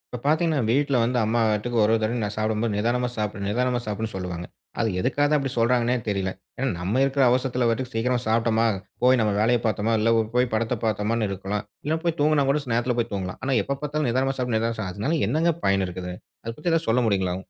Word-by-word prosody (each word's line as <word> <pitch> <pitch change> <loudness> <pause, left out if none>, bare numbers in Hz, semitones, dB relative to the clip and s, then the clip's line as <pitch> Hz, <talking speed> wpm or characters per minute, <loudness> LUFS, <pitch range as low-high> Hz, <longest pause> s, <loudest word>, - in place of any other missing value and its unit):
இப்போ - - -5
பாத்தீங்கன்னா 155 -3 +2
வீட்ல 140 +3 +2
வந்து 125 +2 +1
அம்மா 115 +2 +1
பாட்டுக்கு 110 +3 -1
ஒவ்வொரு 110 +1 +3
தடவை 115 +3 0
நான் 105 0 -3
சாப்பிடும்போது, 110 +1 0
நிதானமா 120 +3 +1
சாப்பிடு 105 -2 -3
நிதானமா 125 +3 +1
சாப்பிடுன்னு 110 +1 -3
சொல்லுவாங்க. 90 -2 -5 0.3
அது 115 -1 +2
எதுக்காகதான் 145 +9 +2
அப்படி 135 -2 -2
சொல்றாங்கன்னே 120 +1 +2
தெரியல. 95 -2 -1 0.3
ஏன்னா, 135 +1 -1
நம்ம 100 +9 0
இருக்குற 135 0 +2
அவசரத்துல 125 -1 +1
பாட்டுக்கு 120 +2 -2
சீக்கிரமா 120 +2 +1
சாப்பிட்டமா, 115 0 +2 0.4
போய் 130 0 +5
நம்ம 105 -1 +2
வேலைய 120 +3 +3
பார்த்தமா, 110 +1 0
இல்ல 115 +2 +3
போ 110 - +3
போய் 125 0 +2
படத்த 115 +2 0
பார்த்தமான்னு 110 0 0
இருக்கலாம். 100 +2 -3 0.2
இல்ல 160 +1 +1
போய் 170 -1 0
தூங்குனா 150 -1 +3
கூட, 145 +2 +2
ச் 125 - -5
நேரத்துல 120 +1 +1
போய் 115 -1 -1
தூங்கலாம். 95 -2 -4
ஆனா 135 0 +1
எப்ப 140 +5 -3
பார்த்தாலும், 150 -2 -1
"நிதானமா 130 +3 0
சாப்பிடு 125 -3 0
நிதானமா 115 +1 -1
சாப்" 95 - -3
அதுனால 145 - -1
என்னங்க 165 +2 +2
பயன் 100 -1 +2
இருக்குது? 90 0 -6 0.3
அது 115 - -4
பத்தி 170 +3 -1
ஏதாவது 165 0 0
சொல்ல 125 +3 +3
முடியுங்களா? 95 -4 +1
115 Hz, 210 wpm, -24 LUFS, 105-130 Hz, 0.4 s, போய்